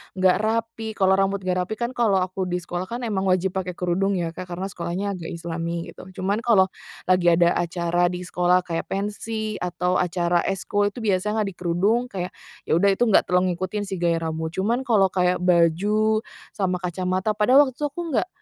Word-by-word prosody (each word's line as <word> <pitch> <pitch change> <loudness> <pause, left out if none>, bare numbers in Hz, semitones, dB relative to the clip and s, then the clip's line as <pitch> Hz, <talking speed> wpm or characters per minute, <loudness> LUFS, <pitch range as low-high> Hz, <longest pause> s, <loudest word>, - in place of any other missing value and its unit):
enggak 185 -1 +4
rapi, 225 0 -2
kalau 190 -1 +3
rambut 195 0 +1
enggak 185 0 0
rapi 220 - -5
kan 235 +2 -2
kalau 220 -7 +2
aku 185 +1 -2
di 180 0 -2
sekolah 175 +2 -4
kan 240 +3 -5
emang 200 -4 -1
wajib 185 0 +2
pakai 185 -1 -3
kerudung 185 +3 0
ya, 170 -2 -1
Kak, 185 +2 -7
karena 190 +3 -4
sekolahnya 175 +2 -4
agak 165 - -7
islami 170 0 -4
gitu. - - -12 0.2
Cuman 200 +3 0
kalau 195 -5 +5 0.4
lagi 180 -1 +3
ada 170 0 +4
acara 175 0 +1
di 180 - -4
sekolah 180 +1 +2
kayak 170 -2 -4
pensi 215 +2 -3
atau 180 0 -1
acara 175 -1 +1
ekskul 205 +2 0
itu 240 - -8
biasanya 210 +2 +1
nggak 205 - -1
dikerudung, 185 +7 +1
kayak 180 -4 -5 0.3
ya - - +1
udah 200 +3 +4
itu 215 - +1
nggak - - +5
terlalu 180 -1 +1
ngikutin 185 +3 -3
sih 190 - -3
gaya 170 -1 +1
rambut, 160 0 -3
cuman 230 +8 0
kalau 200 -6 +4
kayak 180 -1 +1
baju 195 +5 +3 0.3
sama 185 -3 0
kacamata 185 +3 -1
padahal 255 +7 +5
waktu 260 - -6
itu 295 - -2
aku 320 +5 -6
nggak - - +1
185 Hz, 195 wpm, -23 LUFS, 175-210 Hz, 0.4 s, kalau